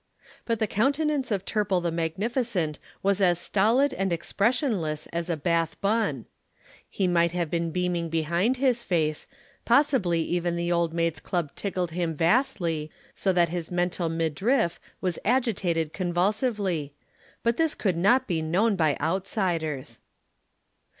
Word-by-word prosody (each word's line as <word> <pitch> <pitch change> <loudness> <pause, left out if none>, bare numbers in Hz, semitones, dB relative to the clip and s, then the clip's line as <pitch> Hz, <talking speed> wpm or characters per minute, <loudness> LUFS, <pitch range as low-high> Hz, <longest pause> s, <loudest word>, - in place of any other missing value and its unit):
But 230 -1 0
the 220 - +1
countenance 280 +6 +1
of 200 -3 -1
Turple 205 -4 +1
the 170 - 0
magnificent 175 - -1 0.2
was 200 0 +2
as 175 -2 +4
stolid 225 +10 +2
and 195 -1 -1
expressionless 190 - 0
as 170 +1 -2
a 170 - 0
Bath 165 +1 0
bun. 200 - 0 0.6
He 195 - -1
might 170 -1 +2
have 175 -3 -2
been 170 -1 0
beaming 175 -1 -1
behind 170 - +1
his 250 -3 +1
face, 155 -6 -1 0.4
possibly 235 - +3
even 175 0 -1
the 170 0 -1
Old 170 -1 +1
Maids' 165 -2 -1
Club 170 -3 -2
tickled 185 -4 -2
him 170 -1 -2
vastly, 165 - +1 0.2
so 195 - 0
that 175 -2 +3
his 170 -1 -4
mental 175 -1 -1
midriff 170 - 0 0.2
was 180 -3 -1
agitated 190 - +1
convulsively; 185 - -1 0.5
but 235 0 +1
this 320 -2 +1
could 190 -5 0
not 200 +10 +3
be 165 -4 -1
known 195 +8 +2
by 155 -5 +2
outsiders. 160 - -2
175 Hz, 140 wpm, -26 LUFS, 165-215 Hz, 0.6 s, as